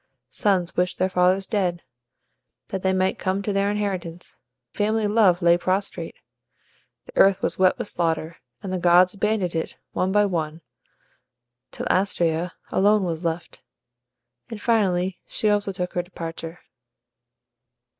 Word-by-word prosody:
Sons 185 -4 +1
wished 180 0 0
their 185 +1 0
fathers 185 +2 +3
dead, 185 -5 -1 0.9
that 190 - -3
they 190 - +1
might 185 0 0
come 190 +1 -1
to 205 - -1
the 195 - +1
inheritance; 195 -4 -3 0.3
family 215 +1 0
love 205 -4 +3
lay 170 0 +5
prostrate. 190 +3 -2 0.9
The - - -15
earth 195 -1 +5
was 170 - 0
wet 185 -1 +4
with - - -4
slaughter, 165 -1 -1 0.3
and 190 -2 -4
the 185 - -1
gods 180 +1 +5
abandoned 205 -3 0
it, 160 -1 -3 0.2
one 185 +1 0
by 210 +1 +4
one, 165 -4 -3 1.1
till - - -6
Astraea 175 -2 0 0.2
alone 205 +1 +3
was 170 -1 -3
left, 170 0 -4 0.9
and 225 -3 -7
finally 190 -5 +1
she 215 - 0
also 205 -1 0
took 180 -1 -4
her 175 - 0
departure. 165 -1 -8
185 Hz, 140 wpm, -24 LUFS, 175-200 Hz, 1.1 s, lay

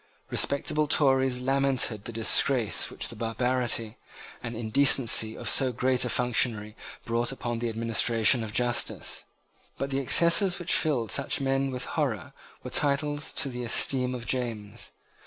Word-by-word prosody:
Respectable 150 +2 0
Tories 135 -4 +1
lamented 135 -5 -1
the - - -7
disgrace 115 +1 +2
which - - -5
the - - -9
barbarity 115 0 -3 0.4
and 120 -1 -7
indecency 115 -1 +4
of - - -8
so 130 -2 +5
great 125 +1 0
a - - -3
functionary 115 -3 -1 0.3
brought 120 +1 -2
upon 120 -3 -6
the 120 0 -3
administration 115 +1 +2
of 110 - -7
justice. 120 +2 -2 0.5
But 135 0 -5
the 135 - -2
excesses 170 +7 +4
which 175 -2 -1
filled 130 -8 -1
such 140 - 0
men 135 0 -2
with 125 -1 -6
horror - - -4 0.3
were - - -9
titles 145 +1 0
to 140 - 0
the 125 -1 -7
esteem 125 +2 +1
of 120 -1 -9
James. 115 -5 -4
125 Hz, 145 wpm, -25 LUFS, 115-135 Hz, 0.5 s, so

